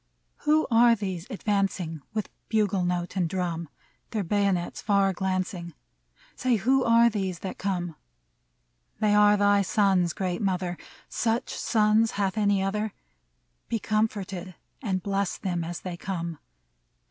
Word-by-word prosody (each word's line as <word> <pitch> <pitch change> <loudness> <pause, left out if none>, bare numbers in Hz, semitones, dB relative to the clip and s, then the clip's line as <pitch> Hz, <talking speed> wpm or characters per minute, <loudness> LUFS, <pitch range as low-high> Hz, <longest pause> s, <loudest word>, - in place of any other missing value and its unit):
Who 310 +1 +4
are 235 +1 +6
these 190 -4 -4
advancing 195 - -1
With 215 -2 -3 0.2
bugle 205 -4 +2
note 175 0 -2
and 180 -4 +1
drum. 170 -3 -2 0.4
Their 215 -3 -1
bayonets 195 -1 0
far 200 -2 +2
glancing? 185 -2 -2 0.6
Say, 255 -1 +1
who 260 +5 +2
are 230 0 +6
these 195 -5 -1
that 190 - -5
come? 175 -4 -2 1.0
They 210 -1 +3
are 210 0 +6
thy 205 0 +4
sons, 190 -3 +2
Great 185 -2 -2
Mother! 180 -3 -1 0.3
Such 230 0 -1
sons 220 0 +2
hath 195 -1 0
any 205 -2 +2
other? 210 +2 -1 0.8
Be 230 - +1
comforted, 200 -4 -2 0.3
and 190 -7 -1
bless 200 -1 -1
them 175 -3 -2
as 170 +1 -5
they 180 -2 -5
come 170 -4 -4
195 Hz, 135 wpm, -27 LUFS, 180-215 Hz, 1.0 s, are